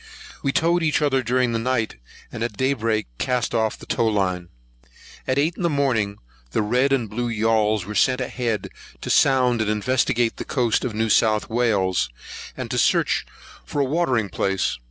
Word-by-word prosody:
We 140 - 0
towed 170 +4 +2
each 155 -2 +2
other 140 -3 +2
during 125 0 +1
the 115 - -1
night, 115 -2 -1 0.3
and - - -7
at 110 -4 -4
day 130 +3 +2
break 110 -3 -1
cast 125 -2 -1
off 110 -2 0
the - - -12
tow 115 - 0
line. 95 -5 -1 0.8
At 130 - 0
eight 155 +4 +1
in - - -8
the 170 - +2
morning, 120 -9 0 0.4
the 110 - +1
red 125 +6 +1
and 130 -5 +1
blue 120 +4 -3
yauls 110 -3 +1
were 105 - -6
sent 125 +4 +2
ahead, 120 -3 -2 0.3
to - - -3
sound 125 -4 +3
and 110 - 0
investigate 115 +1 +1
the - - -4
coast 120 -4 0
of 120 -5 -3
New 110 +1 0
South 110 +1 +2
Wales, 100 - +1 0.5
and - - -5
to - - 0
search - - +2 0.4
for 145 - -4
a 140 - +3
watering 130 - 0
place. 95 -9 -1
120 Hz, 185 wpm, -23 LUFS, 110-130 Hz, 0.8 s, sound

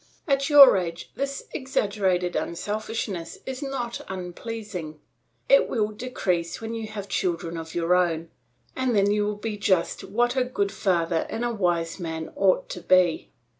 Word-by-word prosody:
At 275 0 +2
your 280 -7 +9
age 170 -2 -4
this 275 0 -3
exaggerated 200 -8 0
unselfishness 205 -1 -3
is 265 +1 -5
not 265 -4 -3
unpleasing. 185 -3 -6 0.5
It - - +5
will 215 -4 0
decrease 195 -7 -2
when 225 0 -5
you 225 -1 -4
have 210 -2 -6
children 170 -3 -1
of 165 -1 -7
your 170 +1 +2
own, 170 -2 +1 0.4
and 260 -3 0
then 200 0 +4
you 210 0 +2
will 210 0 -1
be 210 0 -4
just 190 -4 +1
what 240 +4 0
a 260 - +3
good 205 -6 -1
father 170 -4 0
and 235 - -2
a 240 - -1
wise 175 -4 0
man 160 -2 -5
ought 195 -1 +2
to 180 - -6
be. 180 -3 +3
200 Hz, 160 wpm, -25 LUFS, 175-230 Hz, 0.5 s, your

